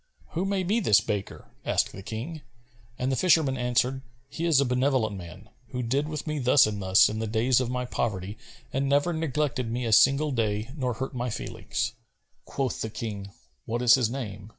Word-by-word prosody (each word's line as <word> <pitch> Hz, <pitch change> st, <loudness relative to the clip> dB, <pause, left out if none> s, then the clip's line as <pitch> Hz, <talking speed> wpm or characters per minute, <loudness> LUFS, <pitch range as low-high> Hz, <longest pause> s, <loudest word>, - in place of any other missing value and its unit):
"Who 175 Hz, +4 st, -1 dB
may 195 Hz, -1 st, 0 dB
be 205 Hz, +6 st, +1 dB
this 110 Hz, -, +5 dB
baker?" 105 Hz, -2 st, -5 dB
asked -, -, +1 dB
the 95 Hz, -, -9 dB
King; 125 Hz, -, -6 dB, 0.6 s
and 130 Hz, +1 st, -1 dB
the -, -, +1 dB
fisherman 160 Hz, -5 st, +3 dB
answered, 125 Hz, +1 st, 0 dB, 0.3 s
"He 165 Hz, +4 st, -4 dB
is 160 Hz, -5 st, +4 dB
a 140 Hz, -, +3 dB
benevolent 125 Hz, -4 st, +1 dB
man, 95 Hz, +3 st, -10 dB, 0.2 s
who 125 Hz, +1 st, -4 dB
did 135 Hz, +5 st, 0 dB
with 155 Hz, -1 st, -5 dB
me 155 Hz, -2 st, -2 dB
thus 130 Hz, +1 st, +5 dB
and 105 Hz, -1 st, -3 dB
thus 95 Hz, +1 st, +5 dB
in 110 Hz, +1 st, -3 dB
the 110 Hz, -, -2 dB
days 115 Hz, +4 st, +2 dB
of 125 Hz, -, -2 dB
my 125 Hz, 0 st, -2 dB
poverty 100 Hz, -5 st, -3 dB, 0.4 s
and 135 Hz, +1 st, 0 dB
never 145 Hz, +5 st, +2 dB
neglected 150 Hz, -5 st, -1 dB
me 120 Hz, +2 st, -2 dB
a 115 Hz, -, -1 dB
single 140 Hz, +6 st, +5 dB
day 110 Hz, -1 st, -1 dB
nor 125 Hz, -5 st, -2 dB
hurt 130 Hz, +4 st, -4 dB
my 125 Hz, 0 st, -2 dB
feelings." 120 Hz, +1 st, -3 dB, 0.5 s
Quoth 135 Hz, -3 st, -3 dB
the 110 Hz, -, -2 dB
King, 105 Hz, -3 st, -6 dB, 0.4 s
"What 120 Hz, +2 st, -2 dB
is 120 Hz, -1 st, +7 dB
his 125 Hz, -4 st, +3 dB
name?" 105 Hz, -5 st, -6 dB
125 Hz, 200 wpm, -27 LUFS, 110-140 Hz, 0.6 s, is